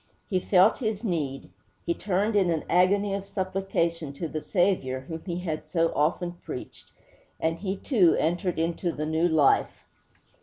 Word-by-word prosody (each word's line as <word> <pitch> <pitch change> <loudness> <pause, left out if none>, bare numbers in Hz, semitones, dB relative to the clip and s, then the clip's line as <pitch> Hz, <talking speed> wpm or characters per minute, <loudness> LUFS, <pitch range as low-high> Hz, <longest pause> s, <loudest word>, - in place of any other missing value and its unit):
He 185 - +2
felt 185 +3 +4
his 220 -3 -2
need; 150 - -3 0.3
he 170 - +1
turned 205 +4 0
in 190 -3 +3
an 160 -2 0
agony 195 +3 +3
of 195 0 -4
supplication 185 -5 -2
to 165 +4 -4
the 155 0 -4
Saviour 175 -10 0
whom 160 +4 -7
he 175 -1 -2
had 160 -4 -4
so 165 -2 +1
often 170 +4 +1
preached; 125 - -8 0.5
and 165 +1 -1
he, 195 +1 -3
too, 190 - +3
entered 175 +3 0
into 170 +2 -1
the 155 -1 -4
new 160 +2 +1
life. 155 -4 +2
175 Hz, 160 wpm, -27 LUFS, 160-195 Hz, 0.5 s, felt